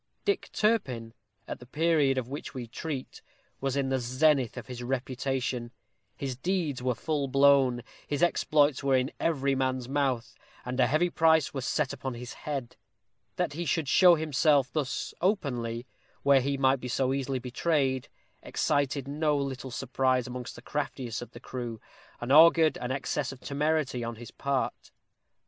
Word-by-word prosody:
Dick 405 - 0
Turpin, 130 - 0 0.3
at - - -5
the 125 - -13
period 150 -2 +2
of 125 -2 -1
which 140 +1 -7
we 125 -2 -4
treat, 135 +3 -6 0.4
was 135 0 -1
in 135 -1 0
the 135 0 +1
zenith 130 +1 +2
of - - -6
his 125 -2 -7
reputation. 130 -1 -2 0.5
His 135 -2 -3
deeds 160 -2 -1
were 125 -1 0
full 150 -1 -1
blown; 135 -3 +4 0.2
his 145 +2 -1
exploits 150 -5 +3
were 135 -1 +3
in 130 +2 +1
every 140 -4 +1
man's 130 -2 -1
mouth; 135 -4 -1 0.3
and 125 +1 -4
a 125 - +5
heavy 155 +6 +2
price 160 -5 +3
was 135 -1 -3
set 150 -4 0
upon 130 -2 -5
his 120 +1 -7
head. 140 -5 -5 0.6
That - - -1
he 170 +4 -3
should 165 -2 0
show 180 +4 +7
himself 150 -4 +2
thus 145 -4 -2
openly, 125 - -1 0.4
where 140 -1 +5
he 140 +2 -1
might 135 0 +3
be 125 - -6
so 130 +1 0
easily 135 -1 -1
betrayed, 130 +1 0 0.3
excited 140 -1 0
no 150 +1 +1
little 135 -2 -3
surprise 130 0 0
among 125 -1 -6
the 120 - -12
craftiest 130 -6 -3
of 120 - -8
the - - -12
crew, 120 -3 -6 0.4
and 120 +2 -3
augured 160 0 +7
an 125 - -4
excess 135 +1 -2
of 135 - -10
temerity 145 -3 -1
on 115 0 -4
his 115 0 -10
part. 140 -1 -2
135 Hz, 165 wpm, -29 LUFS, 125-150 Hz, 0.6 s, show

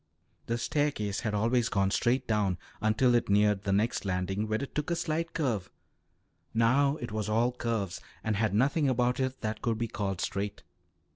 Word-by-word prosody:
The 115 - 0
staircase 120 -7 0
had 105 -2 -2
always 115 +3 +2
gone 100 -1 +1
straight 125 +5 +1
down 105 -5 +1 0.2
until 110 +4 +3
it 120 - +2
neared 105 0 +3
the 100 - +1
next 105 +4 +1
landing, 95 +2 -1
where 110 +4 -1
it 140 - -7
took 150 +1 -2
a 170 - +1
slight 165 0 -2
curve; 115 - -1 0.9
now 135 +5 +4
it 120 -5 -6
was 110 -1 -2
all 115 +3 +2
curves 115 -7 -2 0.2
and 110 -1 0
had 105 -1 +1
nothing 140 +5 +3
about 125 0 +1
it 130 0 -2
that 110 -1 -3
could 115 -2 0
be 115 +1 -1
called 100 -4 -3
straight. 100 +1 -3
115 Hz, 185 wpm, -30 LUFS, 105-125 Hz, 0.9 s, now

